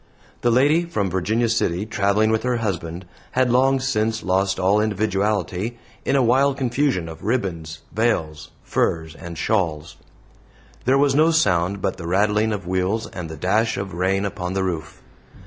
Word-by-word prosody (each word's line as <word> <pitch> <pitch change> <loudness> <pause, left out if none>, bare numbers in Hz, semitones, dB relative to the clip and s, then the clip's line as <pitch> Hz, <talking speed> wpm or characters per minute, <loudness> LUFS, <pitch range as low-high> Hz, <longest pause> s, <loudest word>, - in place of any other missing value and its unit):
The 120 - +2
lady 145 +8 +3
from 105 - -2
Virginia 110 +6 +1
City, 105 -4 0
traveling 105 +1 +1
with 110 - +1
her 125 -1 0
husband, 90 -5 -3 0.3
had 130 -1 +2
long 135 +2 +3
since 115 -4 -1
lost 95 +1 +1
all 95 +3 +3
individuality 105 0 -1 0.3
in - - +1
a 135 - +4
wild 135 +3 +3
confusion 130 - 0
of 80 +1 -10
ribbons, 85 -8 -2
veils, 80 -9 -1
furs, 80 -1 -1
and 85 0 -9
shawls. 85 -3 -1 0.9
There 130 +3 +4
was 140 -1 +3
no 155 +3 +4
sound 100 - +1
but - - -1
the 85 -3 -7
rattling 105 +4 +2
of 100 -4 -4
wheels 95 +5 -1
and 85 -3 -6
the 80 - -7
dash 110 +7 +1
of 100 -1 -4
rain 95 +3 0
upon 90 -2 -4
the 95 0 0
roof. 85 -4 -4
100 Hz, 165 wpm, -22 LUFS, 90-120 Hz, 0.9 s, a